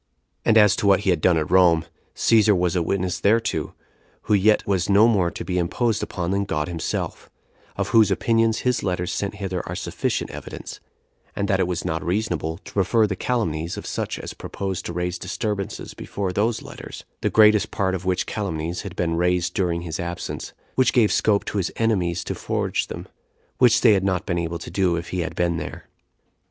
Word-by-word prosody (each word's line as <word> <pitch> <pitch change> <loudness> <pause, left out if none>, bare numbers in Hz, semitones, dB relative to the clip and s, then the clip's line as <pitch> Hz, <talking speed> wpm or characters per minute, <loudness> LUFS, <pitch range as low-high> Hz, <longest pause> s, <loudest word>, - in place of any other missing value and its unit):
And 115 - +4
as 105 -2 +6
to 100 - 0
what 100 -1 +5
he 95 - +2
had 85 -3 0
done 90 0 +4
at 80 +1 -2
Rome, 85 -3 +5 0.3
Cæsar 105 -3 +4
was 90 -1 0
a 90 - +2
witness 90 +1 -1
thereto, 115 +3 +1 0.5
who - - 0
yet 105 +1 +4
was 95 -2 0
no 100 +3 +6
more 95 -7 +2
to - - -7
be 90 -1 -1
imposed 110 +6 0
upon 90 -4 -3
than 100 +1 +1
God 75 -6 -2
himself; 85 -2 -4 0.5
of - - -1
whose 110 -2 +5
opinions 115 -1 +2
his 125 -1 +2
letters 90 -1 -2
sent 100 +4 -3
hither 95 -3 -3
are - - -3
sufficient - - -2
evidence; - - -8 0.6
and 100 - -1
that 95 -2 +1
it 95 - +2
was 90 -2 -3
not 80 0 -2
reasonable 85 -4 -1
to - - -14
prefer 105 +3 +3
the 100 -2 -2
calumnies 85 -8 -2
of - - -7
such - - -3
as - - -7
proposed 95 -2 -5
to 85 - -5
raise 90 +1 -2
disturbances 100 +1 -4
before 95 -2 -4
those 110 +3 0
letters; - - -9 0.2
the - - +1
greatest 105 -1 +5
part 95 -1 -1
of 95 -1 -3
which 90 -1 0
calumnies 85 -5 -3
had 100 -2 -8
been 85 -2 0
raised 90 0 +1
during 85 -3 0
his 85 0 -5
absence, 85 0 -5 0.2
which 130 - +3
gave 115 -4 +4
scope 105 -2 +2
to 105 - -2
his 90 - -1
enemies 90 -7 0
to - - -3
forge - - -2
them, - - -7 0.5
which 125 -3 +5
they 115 -4 +6
had 95 -2 +2
not 95 0 0
been 85 -3 -1
able 85 0 -2
to 85 - -9
do 95 -3 +1
if 85 +1 -5
he 90 - -3
had 90 +1 -3
been 85 -1 +1
there. 75 - -7
95 Hz, 205 wpm, -23 LUFS, 85-105 Hz, 0.6 s, as